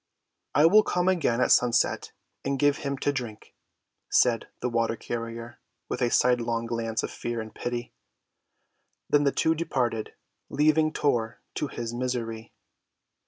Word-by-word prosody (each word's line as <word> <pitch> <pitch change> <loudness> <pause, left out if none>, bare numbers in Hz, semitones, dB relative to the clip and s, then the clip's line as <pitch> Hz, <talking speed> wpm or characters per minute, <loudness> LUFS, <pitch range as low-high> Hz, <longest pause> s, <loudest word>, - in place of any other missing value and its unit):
"I 150 - +6
will 205 +6 +7
come 180 -3 0
again 160 -10 +2
at - - +3
sunset 125 -1 +3 0.3
and 140 0 -1
give 145 +1 +3
him 140 -1 -3
to 145 +1 0
drink," 120 -6 -6 0.6
said 120 -3 +3
the - - -1
water‐ 115 -1 0
carrier, 115 0 -6 0.3
with - - -3
a 120 - +3
sidelong 120 -2 +2
glance 115 -1 -2
of - - -3
fear 120 0 -4
and 110 -1 -7
pity. 120 0 -4 1.2
Then 145 0 +4
the 140 - +4
two 160 - +2
departed, 125 -9 -2 0.3
leaving 155 +1 +3
Tor 120 -8 0
to 150 - -2
his 120 -3 -5
misery. 115 -2 -3
120 Hz, 145 wpm, -27 LUFS, 115-145 Hz, 1.2 s, will